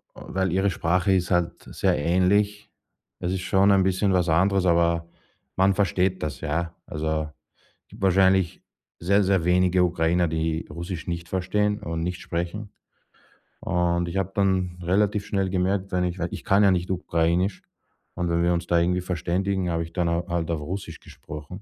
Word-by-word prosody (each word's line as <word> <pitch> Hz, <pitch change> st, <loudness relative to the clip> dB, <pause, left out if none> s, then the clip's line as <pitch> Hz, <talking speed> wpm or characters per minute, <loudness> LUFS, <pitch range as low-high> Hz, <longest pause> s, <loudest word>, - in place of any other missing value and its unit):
Weil 95 Hz, -2 st, -2 dB
ihre 95 Hz, +2 st, +2 dB
Sprache 90 Hz, +2 st, +1 dB
ist 90 Hz, -2 st, +1 dB
halt 90 Hz, -2 st, 0 dB
sehr -, -, 0 dB
ähnlich. 100 Hz, +6 st, +1 dB, 0.5 s
Es 90 Hz, -, -2 dB
ist 95 Hz, -, -2 dB
schon 95 Hz, +2 st, +3 dB
ein 95 Hz, -1 st, +4 dB
bisschen 95 Hz, +1 st, +1 dB
was 90 Hz, -2 st, +2 dB
anderes, 95 Hz, +4 st, +3 dB
aber 85 Hz, -1 st, +2 dB, 0.5 s
man 95 Hz, +1 st, +3 dB
versteht 95 Hz, -1 st, 0 dB
das, 70 Hz, -5 st, -4 dB
ja. 85 Hz, +3 st, -2 dB
Also, 80 Hz, 0 st, -2 dB, 0.6 s
gibt -, -, -15 dB
wahrscheinlich 95 Hz, -1 st, +3 dB, 0.4 s
sehr 100 Hz, +4 st, +3 dB
sehr 95 Hz, -2 st, +2 dB
wenige 90 Hz, 0 st, +3 dB
Ukrainer, 85 Hz, 0 st, +1 dB
die 80 Hz, 0 st, -2 dB
Russisch 85 Hz, +2 st, -6 dB
nicht 85 Hz, -1 st, -4 dB
verstehen 105 Hz, +3 st, 0 dB
und 85 Hz, -4 st, -4 dB
nicht 90 Hz, +2 st, -3 dB
sprechen 90 Hz, +5 st, -4 dB, 0.9 s
und 85 Hz, 0 st, 0 dB
ich 85 Hz, -, -6 dB
habe 95 Hz, -1 st, -1 dB
dann 95 Hz, -3 st, 0 dB
relativ 100 Hz, +3 st, +1 dB
schnell 95 Hz, -2 st, -1 dB
gemerkt, 95 Hz, +1 st, -1 dB
wenn 90 Hz, -1 st, +1 dB
ich 90 Hz, 0 st, -3 dB
wenn 90 Hz, -1 st, -2 dB
ich -, -, -7 dB
kann 100 Hz, +2 st, +4 dB
ja 100 Hz, -, +5 dB
nicht 90 Hz, -1 st, -1 dB
Ukrainisch 90 Hz, +1 st, 0 dB, 0.5 s
und 90 Hz, -1 st, -2 dB
wenn 85 Hz, 0 st, +1 dB
wir 85 Hz, 0 st, +3 dB
uns 85 Hz, 0 st, -2 dB
da 85 Hz, -, +3 dB
irgendwie 90 Hz, +2 st, +1 dB
verständigen, 90 Hz, +2 st, -1 dB
habe 85 Hz, 0 st, -1 dB
ich 80 Hz, -, -10 dB
dann, 90 Hz, -1 st, 0 dB
äh, 85 Hz, +1 st, 0 dB
halt 85 Hz, -1 st, -2 dB
auf 80 Hz, -2 st, -2 dB
Russisch 95 Hz, +6 st, -6 dB
gesprochen 75 Hz, +6 st, -10 dB
90 Hz, 175 wpm, -25 LUFS, 85-95 Hz, 0.9 s, ja